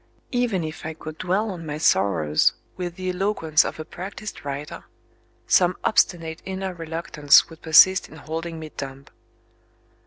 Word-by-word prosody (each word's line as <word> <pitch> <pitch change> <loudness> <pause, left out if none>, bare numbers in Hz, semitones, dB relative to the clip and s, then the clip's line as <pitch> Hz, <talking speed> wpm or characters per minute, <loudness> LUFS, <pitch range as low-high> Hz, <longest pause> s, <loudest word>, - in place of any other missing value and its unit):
Even 240 -8 0
if 155 -1 -7
I 160 0 -5
could 155 0 -9
dwell 195 +4 0
on 175 -3 -7
my 150 -2 -5
sorrows 90 - +2 0.2
with 175 -2 -5
the 185 0 -3
eloquence 180 -5 +2
of - - -5
a 155 - -5
practised 190 +5 -8
writer, 145 +1 -6 0.6
some 180 0 +3
obstinate 165 -6 +1
inner 190 0 -4
reluctance 165 -3 +3
would 165 - -13
persist 185 +4 +6
in - - -13
holding 165 +2 -5
me 155 -1 -8
dumb. 135 0 -7
165 Hz, 150 wpm, -23 LUFS, 155-185 Hz, 0.6 s, persist